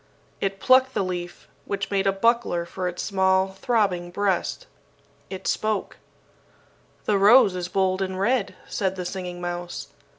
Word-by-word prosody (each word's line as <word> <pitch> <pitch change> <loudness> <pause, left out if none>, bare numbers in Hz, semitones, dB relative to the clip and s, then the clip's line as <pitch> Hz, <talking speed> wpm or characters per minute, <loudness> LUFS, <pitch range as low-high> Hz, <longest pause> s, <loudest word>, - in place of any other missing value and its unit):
It 195 0 -2
plucked 260 +2 +4
the - - +1
leaf, 175 -1 -5 0.2
which 200 0 -3
made 195 0 +1
a - - +5
buckler 195 -4 +1
for 180 +1 -4
its 180 0 -4
small 190 -1 +2
throbbing 190 -3 0
breast. 190 0 -1 0.6
It 190 -1 -7
spoke: 215 -2 -1 1.1
"The 205 -2 +2
rose 205 -1 +6
is 180 -1 -3
bold 185 0 0
and 190 -1 -2
red," 230 +1 +1
said 190 -1 -1
the 180 -1 -5
Singing 180 -1 -5
Mouse. 175 0 -5
190 Hz, 145 wpm, -24 LUFS, 180-200 Hz, 1.1 s, rose